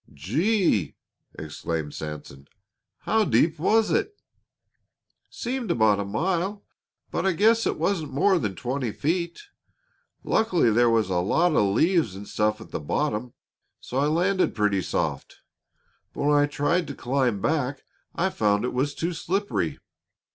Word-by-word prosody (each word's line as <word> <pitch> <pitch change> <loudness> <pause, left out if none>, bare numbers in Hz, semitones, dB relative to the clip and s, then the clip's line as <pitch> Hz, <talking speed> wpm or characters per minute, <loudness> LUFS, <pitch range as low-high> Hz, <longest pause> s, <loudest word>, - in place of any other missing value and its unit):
"Gee!" 155 - +1 0.4
exclaimed 75 0 -4
Sanson. 75 -3 -8 0.5
"How 220 0 +2
deep 165 -5 +2
was 220 +6 +3
it?" 410 0 0 1.1
"Seemed 245 -2 -4
about 110 -9 +3
a 100 - -2
mile; 180 - -1 0.5
but - - -1
I 190 -1 +2
guess 225 +6 +3
it - - -1
wasn't 170 -7 -1
more 185 +7 +3
than 105 -5 -3
twenty 125 0 -3
feet. 170 - -2 0.8
Luckily 180 - +2
there 120 +2 +4
was 110 -4 +1
a 90 - +1
lot 160 - +2
of 100 -1 +2
leaves 160 - +2
and 100 +1 -9
stuff 105 +1 0
at 110 - -12
the - - -3
bottom, 120 - -2 0.5
so 130 - -4
I 145 - +2
landed 180 +5 +1
pretty 105 -3 +1
soft. - - -3 0.8
But - - -4
when 145 +1 +3
I 145 0 +4
tried 150 +4 0
to 140 - -6
climb 125 -4 0
back 140 +2 -1 0.3
I 190 +2 0
found 105 - +1
it - - -3
was 140 +3 -1
too 170 +2 -2
slippery. 195 +5 -2
145 Hz, 145 wpm, -25 LUFS, -, 1.1 s, there